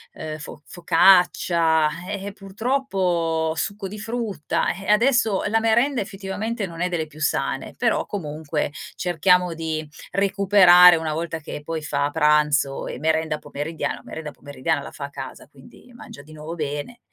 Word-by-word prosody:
uhm, 155 -1 -6
fo 150 -1 -9
focaccia, 170 -2 +3 0.2
eh, 200 -1 -4
eh, 200 - -6
purtroppo 190 -7 -1
succo 200 +4 -3
di 210 +3 -8
frutta 220 -6 -2
eh, 195 +2 -10
adesso 225 -2 +3
la 225 +2 +1
merenda 235 +4 +2
effettivamente 200 +2 -4
non 165 -1 -8
è 180 - +1
delle 165 -3 -2
più 155 0 -14
sane, 155 - -1
però - - +1
comunque 150 -5 -3 0.2
cerchiamo 180 0 +2
di 160 -1 -4 0.2
recuperare 190 -3 +6
una 160 -1 -3
volta 165 +1 -3
che 150 -1 -7
poi 160 +1 -4
fa 145 -1 -1
pranzo 150 -2 +2
e - - -6
merenda 160 0 0
pomeridiana 155 +3 -4
la - - -13
merenda 155 -2 -7
pomeridiana 145 +2 -3
la - - -9
fa 140 - -6
a 140 - -9
casa 135 -1 -9
quindi 145 - -18
mangia 145 -11 -12
di 155 +1 -15
nuovo 155 +2 -7
bene 150 +9 -5
165 Hz, 160 wpm, -23 LUFS, 155-195 Hz, 0.2 s, recuperare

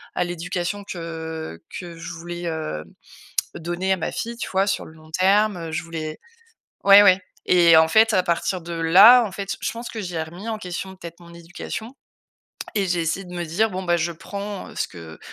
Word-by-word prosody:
à - - +1
l'éducation 175 +3 -3
que, 190 - -7
heu, 160 - -6 0.2
que 175 -2 -9
je 165 - -7
voulais, 175 +1 -7
hem, 155 - -4 0.7
donner 175 +3 -2
à 190 - +2
ma 160 - -3
fille, 235 0 -4
tu - - -4
vois, 190 +1 +2
sur 200 - -1
le - - -13
long 155 0 -17
terme, 200 +3 +3
heu, 165 -1 -6
je 155 - -2
voulais 160 -2 -5 0.7
ouais, 200 +1 +9
ouais 190 -2 +6 0.3
et 170 -2 +6
en 160 0 +6
fait, 220 +6 +5
à 185 - +3
partir 175 +2 -1
de 170 +1 -7
là, 190 +10 +8
en 200 - -6
fait, 195 0 -4
je - - -1
pense 235 +1 -7
que 220 - -5
j'ai 175 -4 -3
remis 175 +8 -7
en 220 - -2
question, 190 0 -6
peut-être, 170 -2 -10
mon 170 0 -14
éducation 175 +8 -7 0.8
et 200 -2 +1
j'ai 175 -1 0
essayé 180 +4 -2
de 180 - -11
me 175 - -3
dire: 215 +8 +1
«Bon 185 0 -4
bah, 175 0 +2
je 170 +1 -1
prends, 200 +4 -6
heu, - - -14
ce - - -1
que 80 -3 -11
175 Hz, 215 wpm, -23 LUFS, 165-195 Hz, 0.8 s, ouais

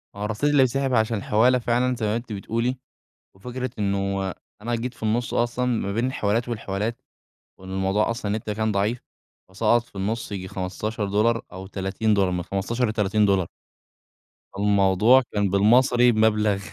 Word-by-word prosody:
ما 100 - -8
هو - - -1
الرصيد 115 +7 0
اللي 145 -2 +5
بيتسحب 135 +1 0
عشان 110 -1 +2
الحوالة 120 +6 +3
فعلًا 125 +2 +1
زي 115 -2 -3
ما 105 - 0
أنتِ 120 -2 -5
بتقولي، 115 +5 -2 0.6
وفكرة 125 +4 -5
إنه 100 -1 -1 0.3
أنا 120 +1 -2
جيت 120 +1 -3
في - - -21
النص 115 +3 -1
أصلًا 120 +1 0
ما 110 -5 -1
بين 115 +4 0
الحوالات 115 -1 -1
والحوالات، 110 0 -3 0.6
وإن 95 0 -11
الموضوع 95 +3 0
أصلًا 110 -3 -3
النت 110 0 -3
كان 110 +1 -1
ضعيف، 105 +5 -1 0.5
وأسقّط 110 +5 +2
في 120 - -28
النص 105 +3 -3
ييجي 95 -2 -5
15$ 105 +4 -1
أو 95 +1 -8
30$ 95 0 0
من 90 -1 -2
15 110 +7 -1
ل30$. 100 -3 +2 1.1
الموضوع 100 +4 +4
كان 100 -2 +1
بالمصري 120 +5 +4
بمبلغ 110 -2 +2
110 Hz, 155 wpm, -24 LUFS, 100-120 Hz, 1.1 s, اللي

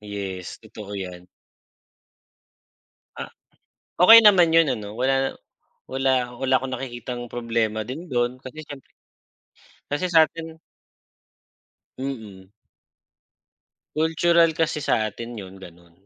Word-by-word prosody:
Yes, 100 -3 -6
totoo 105 -1 -10
yan. 90 -1 -8 1.9
Ah, - - -5 0.7
okay 225 +6 +10
naman 190 -7 +6
yun 165 -3 +5
ano 105 -5 -4
wala 135 +1 +1 0.6
wala 130 -2 +1
wala 135 0 0
akong 130 0 -1
nakikitang 120 -1 -6
problema 115 -2 -2
din 140 +11 -8
dun 120 -2 -1
kasi 135 +4 -10
syempre, 145 -3 -11 1.1
kasi 180 +5 -1
sa 165 -2 +6
atin 160 0 -9 1.4
Mm. 110 -8 -7 1.4
Cultural 165 +1 +3
kasi 160 -2 0
sa 110 -5 +1
atin 120 +3 -8
'yon 95 -2 -10
gano'n. 85 -2 -15
130 Hz, 105 wpm, -23 LUFS, 105-155 Hz, 1.9 s, okay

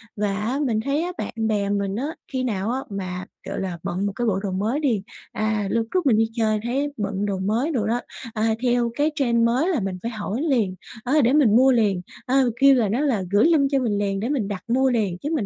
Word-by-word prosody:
Và, 205 -1 -1
á, 235 +7 -1
mình 220 -4 +1
thấy 285 +3 +1
á 360 - -3
bạn - - -4
bè 205 -2 0
mình 200 -1 -1
á 285 +7 -3
khi 260 -2 -3
nào 210 -3 -1
á 260 - -1
mà, 185 -2 -5 0.2
gọi - - -3
là, 185 -3 -3
bận 190 +3 -2
một 200 - 0
cái 240 -1 -1
bộ 195 -2 +1
đồ 195 - -2
mới 215 +9 -1
đi 235 -10 0 0.3
à, 215 -1 -1
lúc 230 -1 +1
trước 365 -4 +1
mình 230 -5 +4
đi 225 0 +2
chơi 215 -2 +1
thấy 280 +4 -1
bận 200 -1 -2
đồ 195 -2 -2
mới 225 - 0
đồ 220 -6 0
đó, 240 +2 0 0.3
à, 220 0 +1
theo 240 -1 +2
cái 300 +2 +1
trend 235 -5 +2
mới 260 +10 +2
là 320 -9 +1
mình 190 -2 -3
phải 235 - -2
hỏi 215 +3 -3
liền, 235 - +1 0.3
á, 255 - -1
để 245 +4 +3
mình 250 -8 +5
mua 260 +2 +6
liền, 205 -7 +2 0.2
ơ, 260 -1 +3
kêu 275 0 +7
là, 230 -5 +2
nó 230 +6 0
là 240 -10 +1
gửi 205 +6 +4
link 300 -5 +4
cho 275 - +3
mình 225 -5 0
liền 195 -1 -1
để 230 +5 -2
mình 255 -9 0
đặt 200 -3 -5
mua 265 +2 +3
liền 210 -8 0
chứ 290 - -4
mình 220 -9 -1
225 Hz, 255 wpm, -23 LUFS, 200-265 Hz, 0.3 s, kêu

